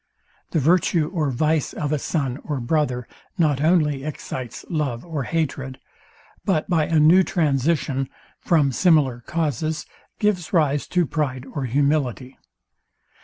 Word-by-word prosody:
The - - -1
virtue 165 +1 +2
or 155 -5 0
vice 155 +3 0
of 145 -1 -3
a 150 - +1
son 135 -3 -2
or 145 -3 -3
brother 125 -2 0 0.3
not 150 -5 +2
only 155 -4 +2
excites 130 -5 -6
love 145 -7 -2
or 155 -6 -3
hatred, 135 -5 -2 0.6
but 175 -7 0
by 160 -4 +2
a 160 -2 +3
new 165 +5 +7
transition, 145 -5 0 0.3
from 150 -6 +2
similar 140 -5 +3
causes, 155 -1 -1 0.3
gives 185 -6 0
rise 145 -4 +2
to 180 -2 +1
pride 135 -4 -2
or 140 -2 -4
humility. 135 -1 0
150 Hz, 130 wpm, -23 LUFS, 135-165 Hz, 0.6 s, new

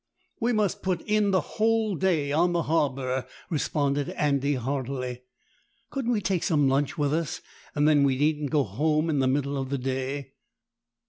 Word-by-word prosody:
"We 235 +1 +1
must 210 -5 0
put 185 -2 -1
in 210 -1 +2
the 190 -2 +3 0.2
whole 220 -1 +2
day 160 -6 +1
on 175 +4 +2
the 170 -1 +1
harbour," 135 -5 0 0.2
responded 145 -2 0
Andy 140 -1 +1
heartily. 130 -1 -3 0.7
"Couldn't 265 -3 -1
we 215 - 0
take 185 -3 0
some 145 -4 +2
lunch 135 +1 +1
with 145 -1 +1
us, 160 -1 -1 0.4
and 145 0 +3
then 150 -2 +5
we 135 -2 +2
needn't 150 0 +1
go 145 -1 +2
home 155 - 0
in 145 - +1
the 130 - +2
middle 140 +1 0
of 130 - -5
the 140 - -1
day?" 135 +1 -3
145 Hz, 175 wpm, -26 LUFS, 135-170 Hz, 0.7 s, then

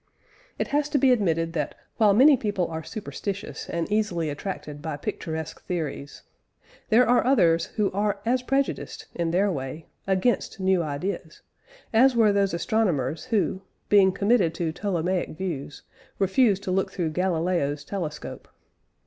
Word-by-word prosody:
It - - -2
has 295 +1 +1
to 295 - +1
be 265 -1 +4
admitted 165 -8 +1
that, 150 -4 -2 0.2
while 210 -3 +5
many 275 +6 +7
people 205 -7 -1
are 160 0 -5
superstitious 200 0 -6
and 170 -1 -2
easily 180 -7 0
attracted 145 -2 -6
by 155 -2 -4
picturesque 160 +2 -5
theories, 155 -5 -4 0.7
there 235 +3 +5
are 245 +1 +4
others 175 -10 +3
who 210 -2 +1
are 205 +1 0
as 250 +2 +2
prejudiced, 270 +2 -2
in 170 -1 -1
their 195 +4 +2
way, 140 +1 -5 0.2
against 195 +3 0
new 190 -1 +2
ideas, 160 +2 -4 0.5
as 250 +3 +5
were 220 -3 +4
those 200 -3 +1
astronomers 170 - 0
who, 210 -5 0 0.3
being 195 -2 +6
committed 200 -4 +2
to 165 -2 -1
Ptolemaic 180 -2 -2
views, 165 -7 -5 0.3
refused 195 +1 +2
to 190 - -2
look 190 +1 0
through 175 -4 -2
Galileo's 165 -4 0
telescope. 160 -6 -5
190 Hz, 145 wpm, -25 LUFS, 165-215 Hz, 0.7 s, many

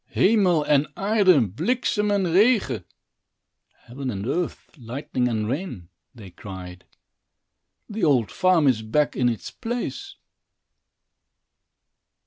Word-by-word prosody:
"Hemel 185 -8 +3
en 145 0 +3
aard, 205 0 +1 0.3
bliksem 210 - 0
en 200 -2 +1
regen" 200 - +3 1.0
(Heaven 130 +2 -6
and 100 -3 -4
earth, 175 +7 -3
lightning 125 -1 -3
and 110 -3 -1
rain), 130 - -5 0.3
they 100 -6 -12
cried, 90 -1 -10 1.0
"the 215 0 -5
old 130 -9 +2
farm 185 -5 +3
is 120 -5 +2
back 140 +7 0
in 125 -1 +2
its 115 - -5
place." 245 - -5
145 Hz, 110 wpm, -24 LUFS, -, 1.0 s, Hemel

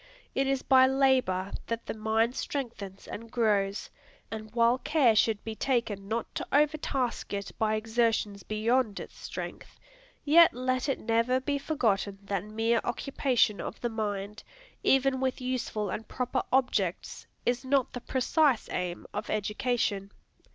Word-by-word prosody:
It 270 0 +1
is 270 -1 0
by 260 -1 +6
labor 260 -9 +2 0.2
that 230 0 -3
the - - -3
mind 220 +2 +1
strengthens 225 -8 -5
and 230 +2 -7
grows: 205 -4 0 0.4
and 215 -1 -6
while 235 +2 +4
care 270 -8 +3
should 215 -1 +2
be 225 - -4
taken 220 -5 -1
not 225 +2 -3
to - - -4
overtask 290 -4 +1
it 200 -1 -3
by 215 -1 +2
exertions 220 -2 0
beyond 215 +2 0
its - - -9
strength, - - -8 0.5
yet 325 -1 +7
let 255 +2 -1
it 275 - 0
never 230 +3 +2
be 280 +2 -1
forgotten 215 -9 0
that 200 -2 -2
mere 225 +2 0
occupation 245 -4 +1
of - - -6
the 240 - 0
mind, 210 -2 -4 0.4
even 270 0 +3
with 260 -1 -1
useful 250 -5 -2
and 225 - -5
proper 250 -1 -1
objects, 260 0 0 0.2
is 245 +1 +1
not 265 -1 +1
the 245 - -5
precise 265 0 +2
aim 180 -1 -3
of - - -4
education. 210 -1 -1
230 Hz, 145 wpm, -29 LUFS, 215-260 Hz, 0.5 s, yet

